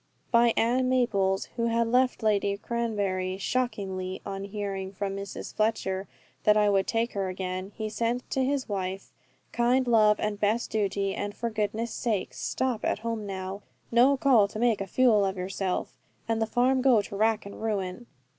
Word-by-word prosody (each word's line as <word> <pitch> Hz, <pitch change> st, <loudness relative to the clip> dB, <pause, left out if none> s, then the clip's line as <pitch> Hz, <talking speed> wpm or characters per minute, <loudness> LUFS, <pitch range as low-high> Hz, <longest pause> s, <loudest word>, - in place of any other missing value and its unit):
By 235 Hz, -1 st, +4 dB
Ann 250 Hz, +3 st, +2 dB
Maples, 200 Hz, -7 st, +1 dB
who 230 Hz, 0 st, +1 dB
had 230 Hz, 0 st, +2 dB
left 250 Hz, 0 st, +2 dB
Lady 200 Hz, -2 st, +2 dB
Cranberry 200 Hz, -5 st, -2 dB
"shockingly," 195 Hz, -5 st, -2 dB
on 195 Hz, 0 st, -4 dB
hearing 200 Hz, -2 st, -4 dB
from 195 Hz, 0 st, -3 dB
Mrs. 200 Hz, -1 st, -6 dB
Fletcher 205 Hz, -3 st, -1 dB, 0.4 s
that 210 Hz, 0 st, +5 dB
I 210 Hz, -1 st, +4 dB
would 195 Hz, -1 st, +2 dB
take 230 Hz, +1 st, 0 dB
her 195 Hz, -2 st, -1 dB
again, 185 Hz, +1 st, -4 dB
he 220 Hz, -1 st, -3 dB
sent 235 Hz, +3 st, -2 dB
to 265 Hz, -, +1 dB
his 275 Hz, 0 st, 0 dB
wife 190 Hz, -1 st, -4 dB, 0.4 s
"kind 245 Hz, +2 st, +2 dB
love 215 Hz, -3 st, +5 dB
and 210 Hz, -1 st, -2 dB
best 215 Hz, +3 st, 0 dB
duty, 200 Hz, -2 st, 0 dB
and 205 Hz, 0 st, -4 dB
for 235 Hz, -1 st, -3 dB
goodness' 215 Hz, +2 st, -2 dB
sake, 220 Hz, -6 st, -2 dB
stop 255 Hz, -4 st, -2 dB
at -, -, +1 dB
home 225 Hz, -3 st, -2 dB
now. 190 Hz, +1 st, -5 dB, 0.3 s
No 255 Hz, +4 st, +5 dB
call 250 Hz, -7 st, +5 dB
to 205 Hz, -, -8 dB
make 230 Hz, -2 st, +2 dB
a 195 Hz, -, -3 dB
fule 225 Hz, -1 st, +4 dB
of 190 Hz, 0 st, -1 dB
yourself, 185 Hz, 0 st, -2 dB, 0.3 s
and 225 Hz, 0 st, 0 dB
the 225 Hz, -, +1 dB
farm 255 Hz, +3 st, +2 dB
go 250 Hz, -5 st, +4 dB
to 200 Hz, -, -8 dB
rack 220 Hz, +1 st, +1 dB
and 200 Hz, -, -9 dB
ruin. 205 Hz, 0 st, -3 dB
215 Hz, 175 wpm, -27 LUFS, 195-235 Hz, 0.4 s, that